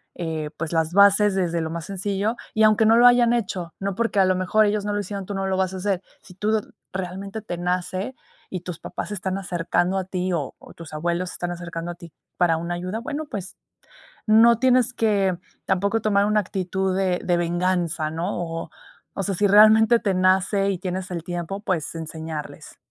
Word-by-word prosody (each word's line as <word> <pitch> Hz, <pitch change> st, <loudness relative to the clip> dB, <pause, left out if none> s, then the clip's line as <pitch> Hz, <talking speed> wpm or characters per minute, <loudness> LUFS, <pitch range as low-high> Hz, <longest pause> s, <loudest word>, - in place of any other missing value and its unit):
eh, 160 Hz, -3 st, -3 dB
pues, 165 Hz, 0 st, -4 dB
las 160 Hz, -1 st, +1 dB
bases 200 Hz, +1 st, +5 dB
desde 170 Hz, -3 st, 0 dB
lo 160 Hz, -, -3 dB
más 165 Hz, -1 st, -5 dB
sencillo, 200 Hz, +3 st, -2 dB, 0.2 s
y 220 Hz, -, +3 dB
aunque 215 Hz, +1 st, +5 dB
no 225 Hz, +1 st, +6 dB
lo 240 Hz, +1 st, +8 dB
hayan 245 Hz, -1 st, +5 dB
hecho, 185 Hz, -7 st, -2 dB
no 195 Hz, -1 st, -2 dB
porque 230 Hz, -1 st, 0 dB
a 190 Hz, -, +6 dB
lo 185 Hz, 0 st, +2 dB
mejor 185 Hz, +4 st, +3 dB
ellos 210 Hz, 0 st, 0 dB
no 205 Hz, -, -1 dB
lo 205 Hz, -, 0 dB
hicieron, 200 Hz, 0 st, -5 dB
tú 205 Hz, -, -5 dB
no 195 Hz, 0 st, -2 dB
lo 190 Hz, -, 0 dB
vas 190 Hz, 0 st, 0 dB
a -, -, -4 dB
hacer. 190 Hz, -1 st, -1 dB, 0.2 s
Si 180 Hz, -, -15 dB
tú, 210 Hz, +3 st, -1 dB, 0.4 s
realmente 190 Hz, +3 st, -5 dB
te 180 Hz, -5 st, -5 dB
nace 180 Hz, +6 st, -2 dB, 0.4 s
y 185 Hz, -, -4 dB
tus 180 Hz, -2 st, -6 dB
papás 175 Hz, -, -6 dB
se -, -, -4 dB
están 190 Hz, -1 st, -3 dB
acercando 180 Hz, 0 st, 0 dB
a 190 Hz, -, 0 dB
ti 185 Hz, 0 st, -2 dB
o 150 Hz, -6 st, -3 dB
o -, -, -14 dB
tus 165 Hz, -2 st, -11 dB
abuelos 175 Hz, +3 st, -1 dB
se -, -, -9 dB
están 175 Hz, 0 st, -3 dB
acercando 170 Hz, -1 st, -5 dB
a -, -, -8 dB
ti 170 Hz, -2 st, -13 dB, 0.3 s
para 170 Hz, -2 st, +3 dB
una 170 Hz, +2 st, -3 dB
ayuda, 185 Hz, +5 st, -4 dB
bueno, 295 Hz, +5 st, -4 dB
pues, 195 Hz, -1 st, -6 dB, 0.7 s
no 225 Hz, +1 st, +6 dB
tienes 255 Hz, -1 st, +3 dB
que 200 Hz, -6 st, +1 dB, 0.3 s
tampoco 200 Hz, +4 st, +1 dB
tomar 200 Hz, -2 st, +3 dB
una 210 Hz, 0 st, +3 dB
actitud 190 Hz, 0 st, -2 dB
de 185 Hz, -2 st, +1 dB
de 175 Hz, -, +2 dB
venganza, 175 Hz, -2 st, 0 dB
¿no? 165 Hz, +2 st, -3 dB
O 165 Hz, -1 st, -5 dB, 0.4 s
o 195 Hz, -, -2 dB
sea, 195 Hz, -, -1 dB
si 205 Hz, -, +3 dB
realmente 220 Hz, +3 st, +7 dB
te 200 Hz, -4 st, 0 dB
nace 190 Hz, +2 st, +2 dB
y 190 Hz, -, -2 dB
tienes 185 Hz, +1 st, -4 dB
el 170 Hz, -2 st, -3 dB
tiempo, 175 Hz, +2 st, -4 dB
pues 180 Hz, -8 st, -2 dB
enseñarles. 160 Hz, -1 st, -7 dB
185 Hz, 210 wpm, -23 LUFS, 175-205 Hz, 0.7 s, lo